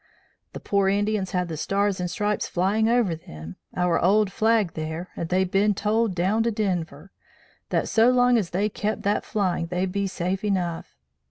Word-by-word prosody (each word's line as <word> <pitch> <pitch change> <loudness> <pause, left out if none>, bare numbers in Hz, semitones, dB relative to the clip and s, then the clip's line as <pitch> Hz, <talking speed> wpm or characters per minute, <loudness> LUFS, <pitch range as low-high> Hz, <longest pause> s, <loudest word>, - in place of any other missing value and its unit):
"'The - - -6
pore 200 -1 +1
Indians 205 -1 0
had 180 -1 -1
the 165 - -5
Stars 200 +4 0
and 180 0 -2
Stripes 210 +3 -1
flying 205 +5 +1
over 230 -8 +2
them, 80 - -10 0.2
our 180 -1 +1
old 200 +3 +3
flag 220 -3 +2
thar, 160 +3 -5
and 165 - -4
they'd 185 0 +1
bin 205 +1 +2
told 215 0 0
down 190 +6 +1
to 230 - +1
Denver, 180 -6 -3 0.6
that - - 0
so 225 +2 +4
long 250 -1 +4
as 205 -7 +1
they 195 +4 0
kept 215 +1 -3
that 205 +1 +1
flying 185 -5 -1
they'd 180 +2 -2
be 200 +1 -1
safe 185 +1 -3
enough. 180 - -2
195 Hz, 180 wpm, -24 LUFS, 180-210 Hz, 0.6 s, so